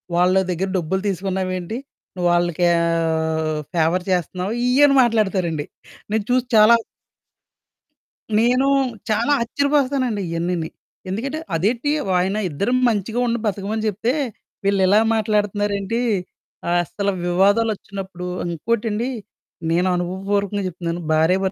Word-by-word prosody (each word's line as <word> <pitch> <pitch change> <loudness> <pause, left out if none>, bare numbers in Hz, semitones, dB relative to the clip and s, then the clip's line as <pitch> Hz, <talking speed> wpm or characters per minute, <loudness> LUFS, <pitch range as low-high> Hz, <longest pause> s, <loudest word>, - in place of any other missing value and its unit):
వాళ్ళ 180 +2 +3
దగ్గర 185 +2 -1
డబ్బులు 185 +3 -1
తీసుకున్నావేంటి? 185 +1 -2 0.4
నువ్వు 175 -1 0
వాళ్ళకీ 175 0 +1
ఆహ్, 160 -2 0
ఫేవర్ 170 +2 +1
చేస్తున్నావు 180 +3 -1
ఇయ్యని 275 +2 +5
మాట్లాడతారండి 190 -9 +1 0.5
నేను 220 -1 +1
చూసి 255 0 +2
చాలా 215 +2 +8 1.6
నేను 250 +4 +3 0.4
చాలా 230 +6 +1
ఆశ్చర్యపోతానండి. 265 -3 +1
ఇయన్నీని 170 -1 -2 0.4
ఎందుకంటే 270 +10 -3 0.2
అదేంటి 235 - 0 0.3
ఆయన 190 +3 0
ఇద్దరు 200 +11 -1 0.2
మంచిగా 220 +2 -1
ఉండి 235 0 0
బతకమని 210 +2 -2
చెప్తే, 215 +5 0 0.5
వీళ్ళు 200 -1 +2
ఇలా 205 +3 +5 0.2
మాట్లాడుతున్నారేంటి? 205 0 0 0.7
అసలు 175 +4 0 0.2
వివాదాలొచ్చినప్పుడు 195 -1 0 0.2
ఇంకోటండి 225 +6 -1 0.6
నేను 175 +2 +2
అనుభవపూర్వకంగా 195 +3 -1
చెప్తున్నాను 170 -1 -4
భార్య 160 +4 +3
195 Hz, 100 wpm, -21 LUFS, 175-225 Hz, 1.6 s, చాలా